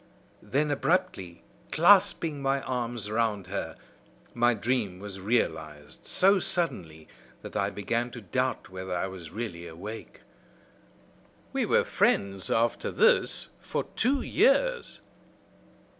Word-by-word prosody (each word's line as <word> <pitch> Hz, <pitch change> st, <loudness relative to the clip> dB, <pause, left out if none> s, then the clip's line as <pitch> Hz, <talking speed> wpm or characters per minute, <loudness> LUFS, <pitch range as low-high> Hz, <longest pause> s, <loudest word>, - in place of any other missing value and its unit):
Then, 150 Hz, +2 st, 0 dB
abruptly, 140 Hz, -, -1 dB, 0.3 s
clasping 170 Hz, -4 st, +4 dB
my 135 Hz, 0 st, +1 dB
arms 120 Hz, -4 st, -3 dB
round 110 Hz, -3 st, 0 dB
her, 95 Hz, +2 st, -4 dB, 0.6 s
my 120 Hz, 0 st, +3 dB
dream 110 Hz, -4 st, -1 dB
was 95 Hz, 0 st, -8 dB
realized 80 Hz, -9 st, -2 dB
so 195 Hz, +1 st, +4 dB
suddenly 85 Hz, -, -1 dB, 0.4 s
that -, -, -9 dB
I -, -, +1 dB
began 115 Hz, +4 st, -2 dB
to 120 Hz, -, -8 dB
doubt 130 Hz, +6 st, -2 dB
whether 95 Hz, -1 st, -5 dB
I 85 Hz, -, -1 dB
was 95 Hz, -4 st, -8 dB
really 90 Hz, -6 st, -6 dB
awake. 100 Hz, +7 st, -9 dB, 1.3 s
We -, -, 0 dB
were -, -, +4 dB
friends 95 Hz, -1 st, 0 dB
after 115 Hz, +1 st, +1 dB
this 480 Hz, +1 st, +2 dB
for -, -, -3 dB
two 270 Hz, +1 st, +1 dB
years." 485 Hz, -, +2 dB
115 Hz, 115 wpm, -28 LUFS, 95-145 Hz, 1.3 s, clasping